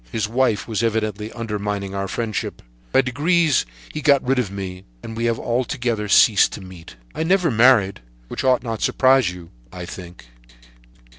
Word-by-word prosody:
His 110 -1 -1
wife 115 -2 0
was 110 -2 -2
evidently 110 -1 -2
undermining 105 -3 -4
our 100 0 -3
friendship. 110 +1 -4 0.3
By - - +5
degrees 150 - +1 0.3
he 155 - -4
got 140 -3 +3
rid 135 0 +2
of 115 -6 -1
me, 95 -2 -7 0.2
and 115 - -7
we 115 +1 -2
have 115 -1 +1
altogether 120 -3 -2
ceased 100 0 +5
to - - -7
meet. 90 -7 -12 0.2
"I - - -4
never 175 -1 +2
married, 115 - +4 0.3
which - - -5
ought 130 -2 +3
not 115 -3 -4
to - - +1
surprise 130 -5 +3
you, 90 -2 -10 0.2
I 90 -1 -7
think." 90 -4 -10
115 Hz, 170 wpm, -21 LUFS, 100-130 Hz, 0.3 s, By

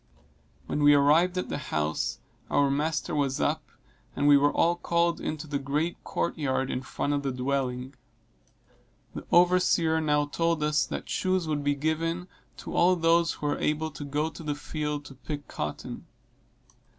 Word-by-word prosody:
When 150 - -2
we 145 0 +7
arrived 160 +6 +4
at 180 - -2
the - - -3
house 80 - -2 0.3
our 140 -1 +3
master 150 +2 -1
was 140 -3 0
up, 155 0 -1 0.5
and 145 - +1
we 145 - +8
were 145 +1 +4
all 170 +1 +2
called 170 -1 0
into 155 0 -4
the 145 -2 -2
great 150 +5 -2
court 170 - -2
yard 135 -2 0
in 125 - -2
front 145 +2 -2
of 145 - 0
the 140 -1 -2
dwelling. 130 0 -2 1.2
The - - -8
overseer 175 -2 +4
now 150 -1 +2
told 165 +1 0
us 150 -3 +2
that - - -5
shoes 185 -2 0
would 150 -2 -1
be 145 0 +1
given 165 +4 -1 0.3
to - - -7
all 180 +2 +5
those 165 0 +3
who - - -7
were 145 - 0
able 155 +1 0
to 150 - -8
go 150 +3 -1
to - - -10
the 150 -2 -2
field 150 -1 -4
to 135 - -10
pick 145 +2 -7
cotton. 75 0 -6
150 Hz, 175 wpm, -27 LUFS, 140-165 Hz, 1.2 s, we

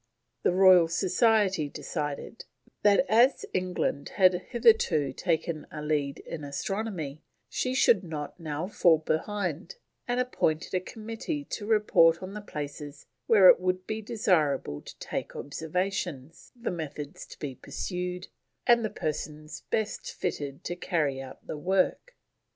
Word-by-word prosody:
The - - +3
Royal 185 -2 +7
Society 190 - +2
decided 150 +9 -5 0.4
that 205 +5 +5
as 240 +5 +4
England 180 -6 -1
had 185 -2 +6 0.2
hitherto 215 - +3
taken 165 -2 -1
a 150 -1 -7
lead 145 -2 -1
in 155 -3 -7
astronomy, 160 0 -4 0.3
she 255 0 -1
should 225 -7 +4
not 155 -1 -6
now 155 0 -3
fall 175 -5 +4
behind, 175 - -2 0.3
and 245 +1 0
appointed 175 -10 0
a 185 - +2
committee 225 - -5
to 205 - -4
report 190 -6 +4
on 185 +1 -6
the 210 - -6
places 145 -5 -7 0.2
where 200 -5 +7
it - - +8
would 185 0 -1
be 220 0 -3
desirable 160 - +1
to - - -12
take - - -5
observations, 165 -1 -4
the 235 - -2
methods 150 -4 -6
to - - -12
be 145 -3 -5
pursued, 180 +5 -5 0.4
and 235 -1 +5
the 215 - 0
persons 150 -1 -5
best 220 -1 -2
fitted 140 -1 -4
to 175 - -3
carry 150 -6 -1
out 130 -1 -11
the 150 - -5
work. 190 - 0
180 Hz, 140 wpm, -28 LUFS, 150-210 Hz, 0.4 s, it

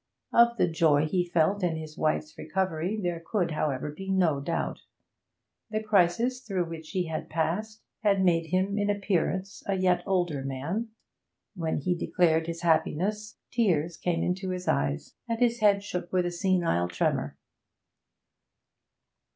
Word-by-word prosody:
Of 235 0 +5
the 180 - +3
joy 160 -3 +3
he 175 +2 0
felt 175 +4 +2
in 175 -3 +1
his 155 -1 -7
wife's 155 0 -1
recovery 185 +3 -2
there 175 -4 -2
could, 175 -2 0
however, 150 -2 -1
be 195 +6 -8
no 175 -7 +2
doubt. 140 +4 -2 0.9
The 215 0 -2
crisis 215 +5 +2
through 190 -7 -1
which 160 -1 -8
he 185 -3 -1
had 160 -1 -4
passed 190 +8 -2 0.2
had 200 -3 +3
made 165 -2 +2
him, 190 +4 0
in 205 0 +1
appearance, 195 -1 -1
a 195 - +1
yet 180 -2 +2
older 175 -7 0
man; 145 - -3 0.7
when 165 -5 -2
he 180 +5 0
declared 165 -2 +1
his 170 0 -5
happiness 200 +6 0
tears 175 -9 +1
came 170 -1 -1
into 185 +1 -1
his 180 0 -4
eyes, 70 0 0 0.2
and 230 - 0
his 240 -1 +2
head 200 -2 +4
shook 180 -3 -4
with 180 -1 +2
a 175 - -1
senile 175 - +1
tremor. 90 0 -1
180 Hz, 150 wpm, -28 LUFS, 160-200 Hz, 0.9 s, Of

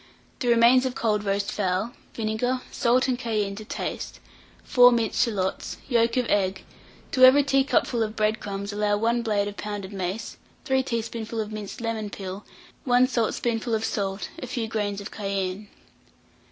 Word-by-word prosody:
The 255 - -2
remains 240 +2 +5
of 255 - -5
cold 210 -2 0
roast 200 0 -1
fowl, 195 +3 -1 0.2
vinegar, 230 +3 -1
salt 250 +1 +2
and 250 -2 0
cayenne 215 -5 -1
to 215 - -6
taste, - - -5 0.4
4 245 0 +6
minced 230 -1 +2
shalots, 195 -6 -2
yolk 235 -2 +2
of 250 - +2
egg; 190 -2 +1 0.5
to 255 - +3
every 265 +3 +8
teacupful 270 -3 +2
of 215 0 -1
bread 215 0 +1
crumbs 200 0 -5
allow 205 0 +1
1 230 +3 +1
blade 210 -3 0
of 205 - -7
pounded 205 -1 -5
mace, 190 +3 -4 0.3
5 265 -2 +1
teaspoonful 230 -1 -3
of 215 -1 -3
minced 215 +1 -6
lemon 225 -2 -2
peel, 195 0 -7 0.4
1 250 0 +4
saltspoonful 230 -1 0
of 220 0 -1
salt, 195 -1 -2
a 255 - -5
few 235 -2 -3
grains 205 -2 -2
of 200 - -8
cayenne. 195 -1 -3
220 Hz, 165 wpm, -25 LUFS, 205-240 Hz, 0.5 s, every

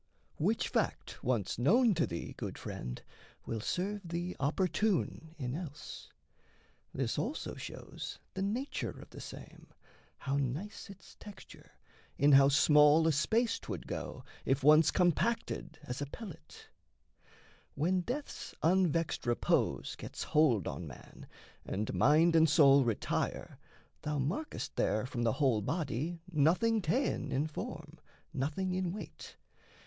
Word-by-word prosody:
Which - - +1
fact - - -2
once 115 -4 0
known 225 - +5
to 165 -2 +1
thee, 85 -1 -5
Good - - -5
friend, 60 0 -6 0.5
will 115 -2 -3
serve 200 - -2
thee 175 +2 -3
opportune 170 +2 0
in 125 -4 -3
else. 150 -2 -7 0.8
This - - -1
also - - -3
shows - - -7 0.2
the 190 - -4
nature 235 +8 -2
of - - -13
the - - -9
same, - - -10 0.5
How 140 +1 -2
nice 145 - -3
its 195 -1 -13
texture, 205 -3 -13 0.4
in 145 +2 +5
how 135 0 +8
small 150 +2 +6
a - - +5
space 220 - +1
'Twould - - -6
go, - - -5 0.2
if 135 +1 0
once 155 +2 +7
compacted 185 +6 0
as 125 +3 -5
a 145 - -2
pellet: 175 - -10 1.1
When 180 +6 +1
death's 270 +10 -5
unvexed 165 -5 +2
repose 120 - +1
gets - - -6
hold 135 - +3
on - - -5
man - - -12 0.4
And 105 +2 -3
mind 150 - +4
and 160 -1 +6
soul 140 -2 +6
retire, 115 -3 -2 0.4
thou 150 0 -2
markest 165 - -3
there 110 +2 +1
From 125 -2 -4
the 115 -2 +2
whole 130 -8 +2
body 160 - -2
nothing 185 +9 +3
ta'en 240 - 0
in 140 +3 +1
form, 160 +1 -7 0.3
Nothing 155 +8 -1
in 185 -1 -1
weight. 210 - -9
155 Hz, 135 wpm, -33 LUFS, 135-185 Hz, 1.1 s, how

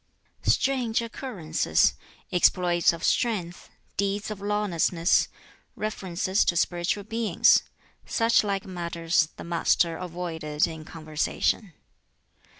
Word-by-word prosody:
Strange 250 -4 +2
occurrences, 225 - 0 0.4
exploits 175 -1 +3
of 170 -1 -8
strength, 185 -8 -1 0.3
deeds 200 +2 -1
of 205 -2 -7
lawlessness, 190 -4 +1 0.5
references 190 -2 -1
to 175 - +1
spiritual 175 +4 0
beings 225 -3 +3 0.5
such 230 -1 +3
like 200 -2 -2
matters 170 -3 0
the - - -8
Master 170 0 +1
avoided 165 -4 -2
in 160 -1 -7
conversation. 160 +5 -2
180 Hz, 95 wpm, -26 LUFS, 170-210 Hz, 0.5 s, exploits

